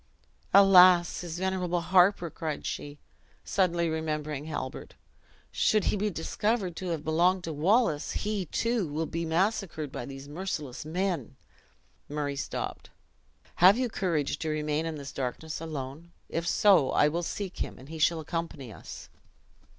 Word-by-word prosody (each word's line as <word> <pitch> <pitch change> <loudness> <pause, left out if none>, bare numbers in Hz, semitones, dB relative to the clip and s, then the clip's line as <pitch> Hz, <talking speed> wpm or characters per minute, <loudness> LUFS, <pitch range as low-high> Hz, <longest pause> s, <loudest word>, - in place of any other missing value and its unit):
"Alas! 185 -3 +7
his 170 -2 -6
venerable 180 -2 -1
harper," 180 -1 +3
cried 155 -2 -4
she, 145 0 -5 0.5
suddenly 175 -3 +1
remembering 155 -2 -3
Halbert; 150 -4 -6 0.6
"should 215 -2 +2
he - - +1
be 210 +1 0
discovered 195 +2 -1
to 185 - -5
have 165 -4 -2
belonged 175 +4 +2
to 165 - -4
Wallace, 165 0 +2
he, 205 -4 -2
too, 230 +1 0
will 155 +2 -2
be 165 +1 -3
massacred 165 -3 -1
by 120 - -6
these 135 0 -9
merciless 150 -5 -5
men." 175 - -2 0.7
Murray 145 -1 -2
stopped. 140 - -5 0.7
"Have 190 +5 +7
you 250 -1 0
courage 165 -9 -1
to 160 - -2
remain 155 +1 -1
in 160 - -4
this 140 -2 -7
darkness 145 +5 -4
alone? 155 +1 -6 0.2
If 165 +1 -2
so, 180 -9 +5
I 145 - +4
will 165 +3 -1
seek 190 +2 -5
him, - - -4
and 130 - -13
he 160 +1 -8
shall 165 +1 +3
accompany 155 -7 -5
us." - - -10
165 Hz, 150 wpm, -28 LUFS, 150-185 Hz, 0.7 s, Alas